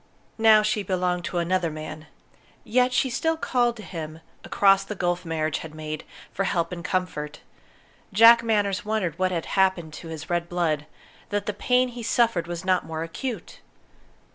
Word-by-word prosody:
Now 220 -1 +6
she 215 0 +1
belonged 180 -2 -1
to 180 - -3
another 175 0 +1
man. 155 0 -8 0.6
Yet 250 +2 +2
she 250 - +2
still 320 +6 0
called 240 -5 +1
to 215 - -9
him, 160 -3 -7 0.2
across 195 -1 +4
the 210 +2 -6
gulf 175 -1 -1
marriage 160 -2 -1
had 160 -1 -9
made, 155 0 -6 0.3
for 195 - -1
help 170 -3 0
and 175 -1 -6
comfort! 180 -6 -3 0.7
Jack 230 +3 +8
Manners 205 -3 0
wondered 200 -7 -2
what 185 0 +2
had 170 -3 -2
happened 185 -5 +1
to 165 - -9
his 160 -1 -7
red 175 -1 -1
blood, 155 -4 -1 0.4
that 205 0 -1
the 210 - -2
pain 250 +4 +2
he 240 0 -8
suffered 230 -6 +1
was 175 +1 -5
not 185 -1 +2
more 160 0 -4
acute. 225 +8 -6
185 Hz, 170 wpm, -25 LUFS, 165-215 Hz, 0.7 s, Jack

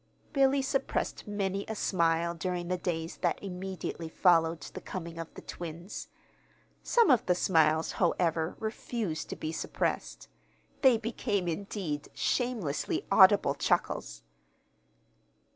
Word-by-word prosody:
Billy 275 -1 +3
suppressed 270 -4 -1
many 200 -1 -1
a 220 - -3
smile 170 -3 +1
during 175 +1 -3
the 180 - 0
days 165 -2 -3
that 175 -2 0
immediately 185 -3 -5
followed 165 -2 +3
the - - -8
coming 170 -2 -6
of 165 - -6
the - - -10
twins. 170 +3 -7 0.7
Some 470 -9 +4
of 250 - +4
the 180 - +4
smiles, 160 -3 +3
however, 165 -2 +1
refused 215 -6 -3
to - - -4
be 155 - -4
suppressed. - - -3 0.5
They 260 -4 +6
became, 220 -4 -2
indeed, 170 -4 -3
shamelessly 225 - -1
audible - - +7
chuckles. 60 0 -1
180 Hz, 120 wpm, -30 LUFS, 165-205 Hz, 0.7 s, audible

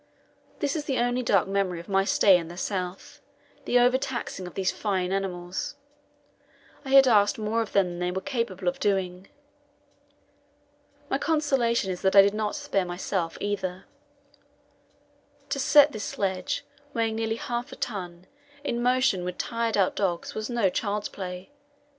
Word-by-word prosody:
This 285 +1 0
is 300 -2 -3
the 270 -2 -1
only 245 +1 +1
dark 200 -7 +2
memory 195 -3 -1
of 170 - -11
my 195 -1 +2
stay 195 -1 +5
in 165 -2 -5
the 175 +1 -10
South 185 -1 -4 0.4
the 245 - +3
over 250 +1 +4
taxing 245 -8 -4
of 180 - -11
these 190 -1 +1
fine 190 -3 -1
animals 185 +4 -3 1.1
I 270 - -7
had 270 0 +7
asked 205 -4 +4
more 220 +1 0
of 220 - -5
them 200 -1 +4
than 175 0 -6
they 180 0 0
were 185 +1 -2
capable 230 -7 -3
of 175 - 0
doing. 190 -2 -1 1.8
My 270 - -1
consolation 270 -11 +1
is 180 - -5
that 190 +1 +2
I 195 - +10
did 200 +1 +2
not 215 +2 -2
spare 285 -10 -1
myself 175 -1 -3
either. 190 -3 -3 1.6
To 275 - -1
set 290 +2 +6
this 215 -6 -5
sledge, 190 -2 -2 0.3
weighing 225 -1 0
nearly 225 0 -1
half 240 +1 -4
a - - -8
ton, 180 -5 -5 0.4
in 240 -4 -2
motion 250 -6 +2
with 180 0 -4
tired 230 -2 -1
out 190 -2 +2
dogs 180 -4 -1
was 215 +1 -4
no 235 -6 +2
child's 205 +1 -2
play. 180 +1 -7
200 Hz, 165 wpm, -26 LUFS, 185-240 Hz, 1.8 s, I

